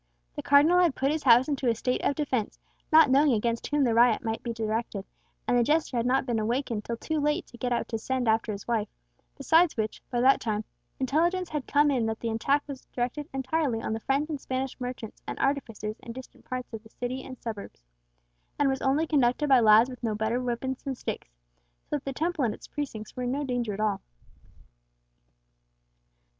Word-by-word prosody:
The - - -4
Cardinal 300 +5 +5
had 345 -6 +3
put 275 +2 +1
his 310 0 -1
house 245 -1 +6
into 275 -4 0
a 230 - +2
state 250 +3 -1
of 285 - +1
defence, 260 -8 -2 0.3
not 310 -3 +7
knowing 280 0 +5
against 230 +1 -1
whom 290 -1 +1
the 240 -3 +2
riot 235 0 +4
might 225 -1 -2
be 235 - -4
directed—and 225 0 -4
the 245 - +4
jester 295 +1 +1
had 235 0 +1
not 265 +1 +2
been 240 -3 0
awakened 230 0 -1
till 235 +1 -4
too 315 +5 -2
late 300 +4 0
to 240 - -15
get 250 - -2
out 240 - 0
to 225 - -2
send 260 +1 -2
after 220 0 +2
his 200 -1 -7
wife, 225 -3 0 0.5
besides 320 +3 +3
which, 220 -1 -2
by 240 - -1
that 265 +3 +5
time, 215 -2 -2 0.3
intelligence 335 +7 +1
had 300 -4 -4
come 290 0 +4
in 245 -5 +1
that 220 0 -3
the 230 - -2
attack 275 +6 +1
was 275 -3 -9
directed 255 +5 -3
entirely 270 -2 -1
on 220 - -3
the 220 - -2
French 275 +5 0
and 300 -4 -5
Spanish 260 0 -3
merchants 250 -3 -6
and - - -4
artificers 225 -6 -2
in 230 - -9
distant 260 +1 -12
parts 255 -2 -5
of 220 - -6
the 220 - -17
city 250 +3 -5
and 255 - -9
suburbs, 210 - -7 0.7
and 285 -1 +3
was 265 0 -1
only 275 +4 +2
conducted 285 -1 +2
by 265 -2 +7
lads 220 +1 +6
with 255 -1 -9
no 225 -3 -1
better 220 +3 -1
weapons 250 +1 -3
than 270 -1 -4
sticks, 150 - -5 0.6
so 295 - -2
that 280 - -12
the 275 - -2
Temple 320 +1 -1
and 220 -4 0
its - - -14
precincts 245 -8 -6
were 250 - -5
in 245 0 -1
no 285 +2 -1
danger 245 -5 -2
at 200 - -5
all. 215 -1 0
250 Hz, 210 wpm, -27 LUFS, 230-285 Hz, 0.7 s, not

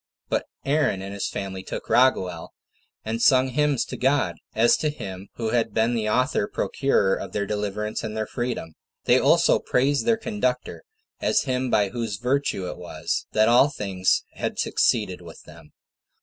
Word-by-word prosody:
But - - -1 0.2
Aaron 140 -9 +1
and 100 +1 -6
his 100 - -2
family 95 -1 -5
took - - -7
Raguel, 95 -10 +2 0.5
and 115 +1 -2
sung 130 0 +5
hymns 145 -2 +1
to - - -7
God, 135 +2 +1 0.2
as 115 +2 +5
to 155 - 0
Him 95 -9 -7
who 115 -2 -2
had 115 -3 0
been 115 +2 +2
the 110 -2 -1
author 125 -2 +1
procurer 105 -8 +1
of 95 -1 -5
their 100 -1 -1
deliverance 105 +1 -3
and 110 -1 -4
their 110 - -1
freedom. 120 -11 -4 0.3
They - - +5
also - - +4
praised 140 - +1
their 230 -1 +4
conductor, 125 - -2 0.4
as - - +2
him 130 -1 -1
by 100 -4 +2
whose 115 -2 -3
virtue 125 -6 -1
it - - -7
was 90 - -3
that 110 0 +4
all 125 +4 +5
things 95 -8 0
had - - -4
succeeded 105 -6 +1
with 85 -2 -12
them. 75 - -15
115 Hz, 170 wpm, -24 LUFS, 100-130 Hz, 0.5 s, sung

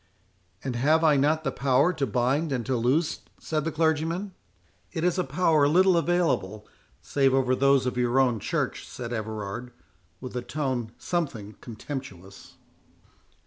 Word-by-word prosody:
"And 130 -3 -3
have 155 +6 +3
I 155 -2 +5
not 150 +3 +2
the - - -1
power 135 +6 +2
to 145 -5 -1
bind 130 +8 0
and 125 -4 -2
to 130 - 0
loose?" 130 +8 +1 0.2
said 155 -1 -2
the 165 - -1
clergyman. 165 +5 0 0.6
"It 160 - -3
is 180 +1 +1
a - - +2
power 160 -5 +2
little 185 +4 +4
available, 165 - 0 0.4
save 135 -2 +2
over 130 -1 +2
those 140 0 +3
of 125 -1 -2
your 125 +1 +2
own 125 -4 +2
Church," - - -2
said 120 -1 -6
Everard, 110 +1 -5 0.5
with 125 -1 -8
a 125 - -1
tone 130 -4 -3
something 130 - -3
contemptuous. 105 - -9
135 Hz, 150 wpm, -26 LUFS, 120-160 Hz, 0.6 s, I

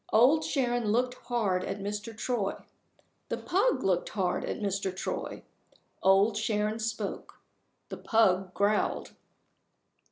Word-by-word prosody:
Old 275 +8 +5
Sharon 245 -4 0
looked 250 +3 +1
hard 205 -7 +1
at 195 - -3
Mr. 210 +2 -5
Troy. 215 -4 -1 0.7
The - - -1
pug 415 +7 +1
looked 185 -2 +1
hard 185 -4 -1
at - - -4
Mr. 200 -2 -1
Troy. - - -4 0.6
Old 195 +3 +4
Sharon 215 0 0
spoke. 225 0 -4 0.5
The - - -6
pug 190 -5 +2
growled. 205 +1 +1
210 Hz, 120 wpm, -29 LUFS, 195-240 Hz, 0.7 s, Old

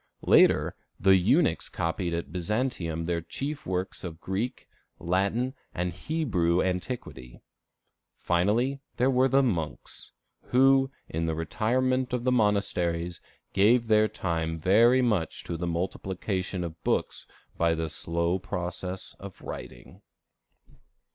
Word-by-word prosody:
Later, - - +5 0.2
the 95 +1 +6
eunuchs 90 -1 +2
copied 85 +2 -2
at 85 -4 -4
Byzantium 90 -4 -2
the 85 0 -1
chief 145 - -5
works 95 +1 -3
of 85 -3 -6
Greek, 100 +8 -3 0.3
Latin, 100 +9 0 0.2
and 90 -1 -1
Hebrew 90 - 0
antiquity. 90 - -3 0.8
Finally, 110 +10 +1 0.2
there 125 +2 +3
were 130 +1 +4
the 135 +1 +4
monks, 85 - -3 0.3
who, 135 +1 +4 0.2
in 80 +1 -2
the 80 - -1
retirement 125 +9 0
of 125 -1 -1
the 125 - +2
monasteries, 90 -7 +1 0.3
gave 115 +5 +4
their 110 -1 +4
time 85 -6 -2
very 115 +10 +5
much 105 -9 0
to 85 - -4
the 85 +1 -3
multiplication 95 +1 -2
of 85 -1 -7
books - - -1 0.3
by 85 -1 +2
the 80 0 -2
slow 85 +3 -1
process 90 +1 -5
of 100 -2 -10
writing. - - -9
95 Hz, 120 wpm, -28 LUFS, 85-120 Hz, 0.8 s, the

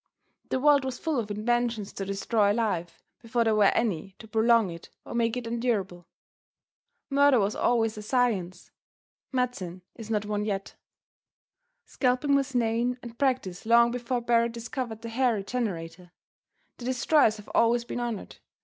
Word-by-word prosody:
The - - 0
world 285 0 +5
was 260 -2 -4
full 315 -5 -1
of 215 -2 -4
inventions 230 0 -1
to 195 - -4
destroy 200 +1 +1
life 205 -7 -2 0.2
before 235 0 0
there 225 -1 +2
were 210 -1 +4
any 195 -3 -1
to 220 - -12
prolong 225 -2 +3
it 170 0 -10 0.2
or - - -8
make 235 0 0
it 245 - -4
endurable. 215 -7 -2 1.0
Murder 280 -2 +5
was 200 +1 0
always 225 -3 +1
a - - -6
science 210 -7 -1 0.6
medicine 195 -9 -2
is 225 -2 -10
not 210 -2 0
one 210 0 -2
yet. 195 -2 -3 1.1
Scalping 255 +2 +1
was 275 -1 +1
known 240 +1 +1
and 235 -1 -10
practiced 250 -9 -1
long 235 +1 +5
before 245 0 -2
Barret 235 0 +2
discovered 235 -1 -5
the 230 - -5
Hair 245 0 +2
Regenerator. 185 -6 -4 0.7
The 240 - -9
destroyers 255 -2 +3
have 210 - -13
always 235 +1 +3
been 245 - -4
honored. 235 -4 -5
230 Hz, 155 wpm, -27 LUFS, 205-245 Hz, 1.1 s, world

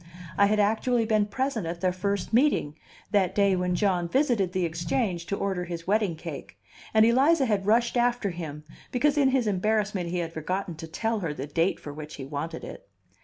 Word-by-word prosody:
I 200 - +5
had 210 +1 +1
actually 225 +3 +2
been 215 -2 +2
present 240 -4 -2
at 170 +1 -5
their 185 -1 +2
first 200 +2 -2
meeting, 245 - +3 0.4
that 195 -4 +2
day 200 -2 +4
when 180 0 0
John 180 -3 +1
visited 240 - +2
the 185 -1 0
Exchange 170 +2 -2
to 200 - -1
order 190 -3 -2
his 170 -1 -6
wedding 205 -3 +1
cake, 155 -3 -8 0.3
and 220 0 +5
Eliza 270 +6 +4
had 205 -4 0
rushed 235 +3 +3
after 240 -4 +1
him, 155 -3 -7 0.3
because 285 +4 +2
in 280 -3 +4
his 260 -2 +1
embarrassment 205 -2 0
he 180 - -2
had 165 -1 -3
forgotten 180 +3 -3
to 165 - -7
tell 225 +7 -1
her 165 -6 -3
the 135 - -4
date 165 +5 0
for 145 - -8
which 155 0 -8
he 135 - -7
wanted 155 +4 -5
it. - - -10
195 Hz, 200 wpm, -27 LUFS, 170-225 Hz, 0.4 s, I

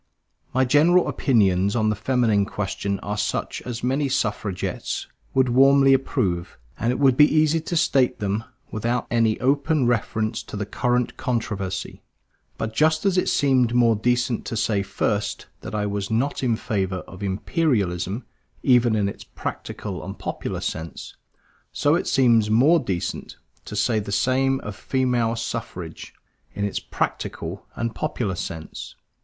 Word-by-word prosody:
My 130 +1 +2
general 160 +7 +4
opinions 100 -6 +2
on 110 -2 +2
the - - -1
feminine 110 -4 +2
question 100 0 -2
are 105 0 -3
such - - -2
as 120 -1 -5
many 135 +3 +1
suffragists 105 -7 -2 0.3
would 130 -1 +4
warmly 135 +2 +6
approve; 90 -10 -1 0.2
and 115 - 0
it 125 - -1
would 135 -3 +4
be 150 +3 +6
easy 155 +1 +3
to 170 +2 -2
state 135 -5 +3
them 105 +2 -1 0.3
without 120 +3 -1
any 115 -2 +2
open 140 +2 +2
reference 110 -2 0
to - - -8
the 105 - -2
current 125 +3 0
controversy. 100 -6 -3 0.6
But 110 0 -3
just 155 - +2
as 195 -2 +3
it 185 - +2
seemed 130 -4 +2
more 115 -2 +5
decent 120 +2 0
to 115 - -3
say 105 -2 +1
first 100 +1 -2
that - - -7
I 105 -1 0
was 100 -1 -2
not 120 +6 0
in 120 -4 +2
favor 95 -5 -2
of 90 - -11
Imperialism 100 - -1 0.4
even 120 -3 +4
in 105 -2 +1
its 100 - -6
practical - - -6
and - - -7
popular - - -4
sense, 80 -1 -5 0.6
so 145 - +2
it 170 - 0
seems 115 -5 +4
more 140 +10 +5
decent 95 - -4 0.3
to - - -7
say 110 +1 +2
the 100 -1 -5
same 135 +4 +2
of 105 -1 -6
Female 125 -3 0
Suffrage, 115 - -6 0.4
in 100 0 -1
its 100 - -2
practical - - -4
and 115 -1 -2
popular 105 -2 -2
sense. 80 -3 -6
115 Hz, 150 wpm, -23 LUFS, 100-130 Hz, 0.6 s, warmly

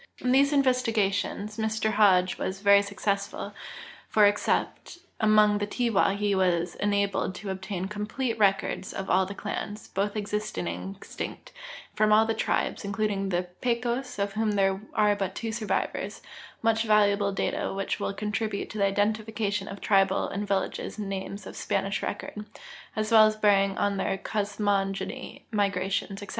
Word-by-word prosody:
In 250 - -1
these 280 +2 +5
investigations 220 -6 +1
Mr 220 0 0
Hodge 185 -4 +4
was 190 +1 -3
very 200 0 +6
successful, 200 0 -3 0.6
for 210 -1 +5
except 205 +10 0 0.2
among 215 -1 +4
the 205 - -1
Tiwa 220 -3 +1
he 205 -1 +1
was 175 -2 +1
enalded 200 -2 0
to 195 0 -5
obtain 190 -1 -4
complete 220 +4 -3
records 195 -1 +1
of 195 - -4
all 185 0 +3
the 200 - -7
clans, 210 +1 -5
both 200 +2 -1
existing 210 -3 -3
and 195 +1 -5
ex 195 - -14
tinct, - - -6
and - - -13
from 215 0 +3
all 215 +1 +6
the 225 - 0
tribes 220 - -1
(including 200 -1 -1
the 175 -1 0 0.2
Pecos, 245 +1 -1
of 200 0 -1
whom 215 0 0
there 195 -1 +1
are 210 -1 +4
but 195 -2 -3
two 225 -1 -3
survivors) 220 -1 -2 0.4
much 225 0 +3
valuable 205 -2 +3
data 195 - -1
which 195 0 -2
will - - -1
contribute 210 +1 -3
to 215 - -6
the 200 - +4
identification 210 0 0
of 195 - -8
tribal 195 -1 +3
and 205 +1 -4
village 195 -1 0 0.2
names 195 -1 -5
of - - -9
Spanish 195 0 -1
record, 210 +1 -5 0.5
as 215 0 -1
well 220 -1 +8
as 215 - -1
bearing 200 -2 +3
on 200 -1 +1
their 195 0 -1
cosmogony, 200 -1 -2
migrations, 195 -1 -1
etc. 200 - -10
205 Hz, 160 wpm, -27 LUFS, 195-215 Hz, 0.6 s, well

